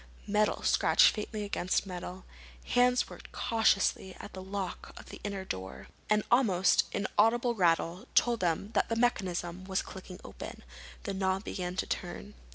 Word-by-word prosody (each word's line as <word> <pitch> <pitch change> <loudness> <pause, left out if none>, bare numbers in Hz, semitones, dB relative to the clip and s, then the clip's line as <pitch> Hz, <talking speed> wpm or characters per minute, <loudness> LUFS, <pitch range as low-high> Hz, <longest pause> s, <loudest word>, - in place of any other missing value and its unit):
Metal 210 +1 +1
scratched - - +5
faintly 210 0 -4
against 200 -1 0
metal. 180 0 -7 0.4
Hands 250 0 +3
worked - - -12
cautiously 195 -4 +1
at - - -9
the 190 - -7
lock 190 0 -5
of - - -13
the - - -10
inner 200 -2 -4
door. 65 - -6 0.2
An 210 0 +3
almost 205 -7 +4
inaudible 225 +4 +2
rattle 175 +2 +1
told 240 -1 +4
them 180 +4 -1
that - - +2
the 230 - 0
mechanism 185 -6 0
was 190 -1 -1
clicking 185 -1 -10
open. - - -9 0.4
The 200 - -3
knob 190 0 0
began 180 -3 -4
to - - -1
turn. 200 +3 -5
195 Hz, 155 wpm, -31 LUFS, 180-215 Hz, 0.4 s, scratched